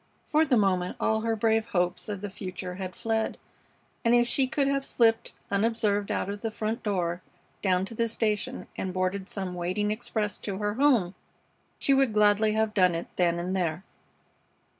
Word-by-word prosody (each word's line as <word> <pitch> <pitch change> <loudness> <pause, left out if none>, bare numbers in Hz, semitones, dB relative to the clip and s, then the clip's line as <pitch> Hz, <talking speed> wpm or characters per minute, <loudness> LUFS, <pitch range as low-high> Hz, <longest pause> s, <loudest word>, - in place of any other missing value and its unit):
For 315 0 +3
the 255 -5 +3
moment 185 -3 +1
all 220 0 +1
her 225 0 0
brave 220 0 +2
hopes 180 -3 -1
of 200 -2 -4
the 205 - -4
future 185 -2 -6
had 185 -1 -6
fled, 225 -1 -1 0.7
and 235 0 +4
if 240 0 +4
she 265 +2 +2
could 275 +1 +1
have 275 0 +1
slipped 225 -4 +2 0.2
unobserved 205 -1 +1
out - - -1
of 200 +1 -5
the 225 - -1
front 220 +2 -3
door, 180 -4 -1 0.4
down 185 -1 +2
to 215 - -8
the 230 +1 0
station, 215 -2 -1
and 185 -1 -4
boarded 185 +1 -1
some 190 -3 -4
waiting 185 +4 -1
express 215 -2 -2
to 195 -2 -4
her 205 0 -1
home, 240 -8 +3 0.6
she 275 - +2
would 270 -4 +3
gladly 210 0 +4
have 220 0 +1
done 180 -4 +4
it 165 - -4
then 170 -1 +2
and 180 +2 -2
there. 175 -1 -1
210 Hz, 185 wpm, -27 LUFS, 185-225 Hz, 0.7 s, and